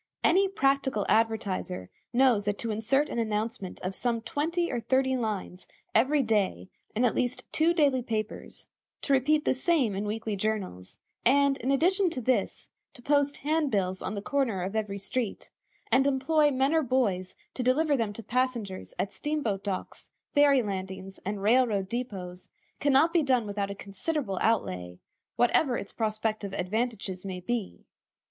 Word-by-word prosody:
Any 390 +3 +4
practical 275 - +1
advertiser 205 - 0 0.2
knows 240 -4 +3
that 205 0 0
to 230 - -3
insert 240 +7 +2
an - - -3
announcement 215 -2 -2
of 185 +1 -3
some 235 +3 0
twenty 320 +9 -1
or 245 - -1
thirty 260 +2 +2
lines 210 -6 -4 0.3
every 270 +5 +3
day 200 - 0 0.3
in 240 +4 +3
at 240 - +2
least 245 0 -1
two 320 +2 +3
daily 285 -6 +3
papers, 220 -3 -4 0.4
to 280 - +1
repeat 300 +3 +3
the - - +3
same 265 - +1
in 200 +2 -3
weekly 215 0 -2
journals, 195 - -3 0.3
and, 280 +2 +4
in 255 - -2
addition 360 +7 +3
to 320 - -4
this, 255 +1 -1 0.3
to 245 - -14
post 285 0 +2
handbills 220 -13 +1
on 200 - -3
the 200 - -5
corner 245 -9 0
of 195 +4 -4
every 210 -2 -2
street, 215 +3 -3 0.4
and 270 +1 +4
employ 295 +3 +3
men 270 +2 +1
or 320 - +4
boys 210 -9 0 0.2
to - - -4
deliver 285 +4 +3
them 225 -5 -1
to 230 - -9
passengers 240 -5 -2
at 195 - -2
steam 300 0 -2
boat 200 -3 -1
docks, 195 -3 -5 0.2
ferry 285 -3 +5
landings, 190 -1 -5
and 200 +1 -4
rail 245 +4 +5
road 200 -4 -1
depôts, 190 -7 -5 0.3
can 285 - +2
not 315 +5 +4
be 340 - +4
done 255 -5 +2
without 200 -1 -2
a 200 - -5
considerable 200 - -3
outlay, 90 - 0 0.4
whatever 245 +1 +3
its 200 - -6
prospective 215 -2 -2
advantages 200 -2 -2
may 190 -2 -5
be. 215 +2 -4
230 Hz, 165 wpm, -28 LUFS, 200-275 Hz, 0.4 s, ferry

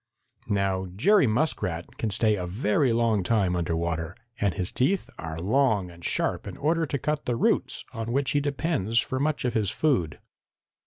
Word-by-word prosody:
Now 95 -2 0
Jerry 190 - +4
Muskrat 105 - -1
can 110 - 0
stay 105 +2 +3
a 90 -3 -4
very 105 +6 +1
long 115 -3 +2
time 95 -2 +1
under 85 -2 -1
water, 85 +1 -2 0.2
and 100 -3 +1
his 90 -3 0
teeth 155 +10 0
are 80 -1 -5
long 105 -1 +1
and 85 0 -15
sharp - - -1
in - - -7
order 160 +3 +1
to 140 - -1
cut 150 +2 -2
the 120 - +1
roots - - 0
on 115 +1 -4
which 135 +1 +1
he 145 - +2
depends 140 - -1
for 130 - -2
much 150 -1 0
of 125 - 0
his 105 -3 +1
food. 115 - 0
110 Hz, 180 wpm, -26 LUFS, 95-140 Hz, 0.2 s, Jerry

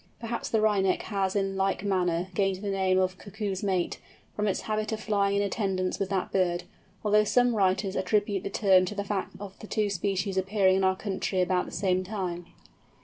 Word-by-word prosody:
Perhaps 235 0 -4
the 220 - +2
Wryneck 200 -3 +2
has 195 -2 -1
in 195 -1 0
like 195 0 0
manner, 180 -3 0
gained 195 +1 0
the 200 - -1
name 190 -1 +2
of 185 0 0
"Cuckoo's 200 -2 -4
Mate" 190 -3 -1 0.4
from 210 0 0
its 195 - 0
habit 215 0 -2
of 220 - -2
flying 200 -2 +1
in 200 - +2
attendance 195 -2 -1
with 195 - -1
that 195 -2 -1
bird; 180 -2 +1 0.4
although 210 0 +5
some 245 +3 +3
writers 190 -1 +1
attribute 200 +1 +1
the - - -3
term 190 -2 +4
to 210 - -5
the 200 - -2
fact 200 -1 -3
of 195 -1 -9
the 215 - -9
two 210 -2 0
species 195 0 -1
appearing 190 0 +3
in 190 - +1
our 190 0 +3
country 190 -1 -2
about 180 0 +1
the - - -9
same 185 -2 0
time. 180 -3 -4
195 Hz, 200 wpm, -28 LUFS, 185-205 Hz, 0.4 s, although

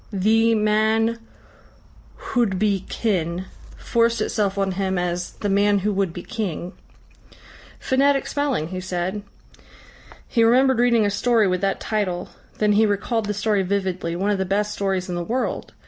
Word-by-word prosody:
"Thi 225 +3 +3
Man 220 +2 +2 1.1
huwdbi 200 -4 0
Kin" 180 -4 -1 0.3
forced 230 0 +1
itself 205 -2 -1
on 195 -1 0
him 190 0 -1
as 175 0 -2
"The 205 - -4
Man 205 +1 +3
who 210 - +1
would 195 -3 0
be 175 +1 -8
King." 190 -5 -4 1.1
"Phonetic 275 +1 +2
spelling," 275 - -1
he 185 0 -5
said. 185 +2 -3 1.1
He 230 - +2
remembered 255 +2 +4
reading 235 -3 +4
a 205 - +1
story 220 +1 +2
with 185 0 0
that 195 0 0
title, 185 -5 -2 0.3
then 210 -1 +2
he 215 +1 +4
recalled 210 +2 -1
the 210 - -2
story 210 0 +1
vividly, 185 -3 -2
one 195 +4 0
of 200 - 0
the - - +1
best 205 +3 -1
stories 190 -2 -1
in 180 - -4
the 175 0 -2
world. 245 +8 -3
205 Hz, 155 wpm, -22 LUFS, 185-225 Hz, 1.1 s, remembered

